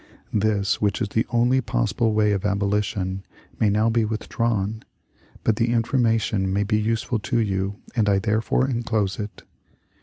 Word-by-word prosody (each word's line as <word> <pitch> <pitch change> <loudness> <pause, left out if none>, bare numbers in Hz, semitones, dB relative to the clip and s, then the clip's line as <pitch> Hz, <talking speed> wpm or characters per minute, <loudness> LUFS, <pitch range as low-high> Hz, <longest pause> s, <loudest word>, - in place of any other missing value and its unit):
This, 105 -1 +1
which 100 -2 +1
is 110 -4 -1
the 110 - 0
only 120 +2 +3
possible 110 - 0
way 105 -1 +3
of 100 -2 -1
abolition, 100 -2 -1 0.4
may 110 - +3
now 105 +2 +2
be 115 0 +2
withdrawn, 110 -1 -1 0.6
but 110 - +2
the 115 0 +1
information 115 -5 +1
may 100 +2 +1
be 105 +1 +1
useful 115 +2 -1
to 120 +4 -1
you 100 -3 0 0.2
and 110 -4 +2
I 100 - +4
therefore 110 +5 +1
enclose 115 -6 -1
it. 105 0 -6
110 Hz, 155 wpm, -23 LUFS, 100-115 Hz, 0.6 s, I